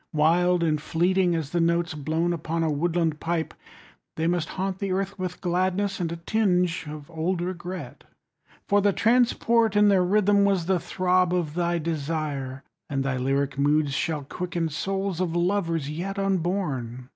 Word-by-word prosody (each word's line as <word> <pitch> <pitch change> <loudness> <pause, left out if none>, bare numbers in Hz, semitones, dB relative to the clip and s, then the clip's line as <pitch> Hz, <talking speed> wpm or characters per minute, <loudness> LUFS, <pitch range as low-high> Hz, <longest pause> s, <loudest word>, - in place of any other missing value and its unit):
Wild 170 +3 +3
and 155 -2 +1
fleeting 175 +2 +1
as 160 -3 -3
the 175 - +1
notes 170 0 +1
Blown 160 +3 -1
upon 165 0 -2
a 160 - +1
woodland 165 0 0
pipe, 165 -1 -2
30 - - -30 0.6
They 160 - -1
must 170 -1 0
haunt 190 0 -3
the 200 -2 -2
earth 195 +1 -2
with 180 -1 -4
gladness 185 +3 0
And 170 -2 -2
a - - -3
tinge 180 -2 0
of 150 +1 -9
old 170 +3 -1
regret. 180 +1 -6 0.6
For 205 0 +3
the 200 0 +3
transport 230 -1 +3
in 205 0 +5
their 190 -2 +4
rhythm 205 +2 +3
Was 195 -4 +2
the 185 0 +2
throb 180 +1 +1
of 165 -4 -1
thy 175 0 0
desire, 150 -4 -3 0.3
And 135 -1 -1
thy 135 -1 -1
lyric 135 +1 -1
moods 145 0 +2
shall 150 +1 -1
quicken 175 +2 -3
35 145 - -7
Souls 195 -1 -2
of 170 -2 -1
lovers 170 -4 0
yet 180 +7 -4
unborn. 170 -11 -2
175 Hz, 170 wpm, -25 LUFS, 155-185 Hz, 0.6 s, in